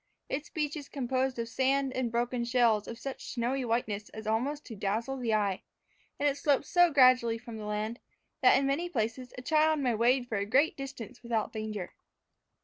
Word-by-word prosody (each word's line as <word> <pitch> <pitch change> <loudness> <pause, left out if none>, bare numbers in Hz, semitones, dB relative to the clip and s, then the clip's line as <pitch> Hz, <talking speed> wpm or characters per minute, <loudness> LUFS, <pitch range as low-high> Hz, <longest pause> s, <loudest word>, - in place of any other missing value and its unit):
Its 295 +2 -3
beach 300 -1 -2
is 290 -3 -7
composed 260 -1 -1
of 230 0 -2
sand 265 +3 +1
and 255 -3 -1
broken 240 +1 0
shells 235 -3 +2
of 230 - -6
such 270 +1 -6
snowy 255 +2 -1
whiteness 225 -3 -2
as 220 0 -9
almost 255 +7 -1
to 225 - -8
dazzle 215 +7 -2
the 240 -3 -1
eye, 205 -3 +1 0.6
and 290 - +2
it 285 0 +1
slopes 285 -2 +1
so 350 -1 +5
gradually 255 -4 +5
from 230 -1 -9
the 210 - -6
land, 210 +3 -3 0.4
that, - - +6
in 275 - +1
many 295 +6 0
places, 245 -2 -2
a 250 - -7
child 310 +1 +3
may 255 -4 +1
wade 245 +3 +2
for 215 -4 -1
a 200 - -1
great 280 +8 +3
distance 255 -3 -8
without 230 -3 -2
danger. 215 -4 -5
245 Hz, 195 wpm, -30 LUFS, 225-275 Hz, 0.6 s, that